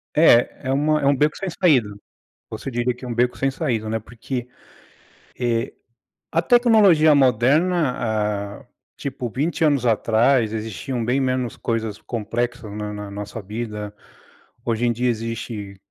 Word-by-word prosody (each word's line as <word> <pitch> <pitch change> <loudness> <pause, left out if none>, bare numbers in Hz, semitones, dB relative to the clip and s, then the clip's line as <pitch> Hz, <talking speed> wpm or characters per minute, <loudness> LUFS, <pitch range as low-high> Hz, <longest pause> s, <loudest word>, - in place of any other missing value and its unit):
É, 130 -4 +4
é - - +2
uma 150 +2 +2
é - - -1
um 140 0 +4
beco 150 +3 +1
sem 195 - -3
saída. 145 - +3 0.6
Você - - -6
diria 120 +1 0
que 125 +1 -11
é - - -6
um 120 - -3
beco 125 +1 +1
sem 135 - +1
saída, 115 -8 -2
né, 110 - -1
porque, 120 +3 -6 0.9
eh, 120 -2 0 0.6
a 165 +1 +2
tecnologia 205 -10 +5
moderna, 125 - +1
hã, - - -19 0.3
tipo 130 -3 -4
20 160 +7 -1
anos 140 -5 +2
atrás 115 +1 +3
existiam 115 +3 -4
bem 125 +4 +1
menos 130 -3 -1
coisas 110 -3 -2
complexas 120 0 -4
na 105 0 -5
na 105 -1 -7
nossa 105 +2 -6
vida. 105 0 -5 0.7
Hoje 115 0 0
em 120 - +2
dia 125 +2 0
existe 110 -3 -5
120 Hz, 150 wpm, -22 LUFS, 110-140 Hz, 0.9 s, tecnologia